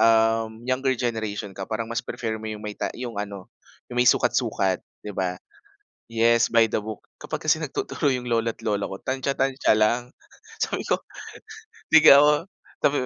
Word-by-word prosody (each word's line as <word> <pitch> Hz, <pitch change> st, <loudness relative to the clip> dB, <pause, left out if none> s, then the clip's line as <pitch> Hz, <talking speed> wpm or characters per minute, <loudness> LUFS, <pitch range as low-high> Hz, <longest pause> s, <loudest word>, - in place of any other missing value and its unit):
uhm, 115 Hz, 0 st, +4 dB, 0.2 s
younger 130 Hz, -1 st, 0 dB
generation 110 Hz, -5 st, -3 dB
ka, 95 Hz, +1 st, -7 dB
parang 110 Hz, +1 st, -2 dB
mas 115 Hz, +1 st, -3 dB
prefer 110 Hz, -2 st, -4 dB
mo 110 Hz, -, -4 dB
'yong 105 Hz, -, -6 dB
may 105 Hz, -, -5 dB
ta -, -, -3 dB
'yong 120 Hz, -3 st, -5 dB
ano 100 Hz, -2 st, -6 dB, 0.4 s
'yong 125 Hz, -, -10 dB
may 125 Hz, -, +5 dB
sukat-sukat, 110 Hz, -6 st, +1 dB, 0.2 s
‘di 105 Hz, -, -6 dB
ba? 90 Hz, -1 st, -2 dB, 0.7 s
Yes, 115 Hz, +1 st, +3 dB
by 115 Hz, -1 st, +5 dB
the 105 Hz, -, -2 dB
book. 110 Hz, 0 st, -8 dB
Kapag -, -, -6 dB
kasi -, -, +3 dB
nagtuturo 145 Hz, -, -1 dB
'yong 125 Hz, -1 st, -2 dB
lola't 115 Hz, -1 st, 0 dB
lola 100 Hz, -2 st, -1 dB
ko, 95 Hz, -, -6 dB
tantya-tantya 135 Hz, -3 st, 0 dB
lang. 120 Hz, +3 st, +1 dB, 0.5 s
Sabi -, -, -1 dB
ko, -, -, 0 dB, 0.9 s
'di 160 Hz, -, +9 dB, 0.2 s
ako 150 Hz, +4 st, +5 dB, 0.3 s
sabi 145 Hz, -, +2 dB
115 Hz, 165 wpm, -24 LUFS, 105-125 Hz, 0.9 s, di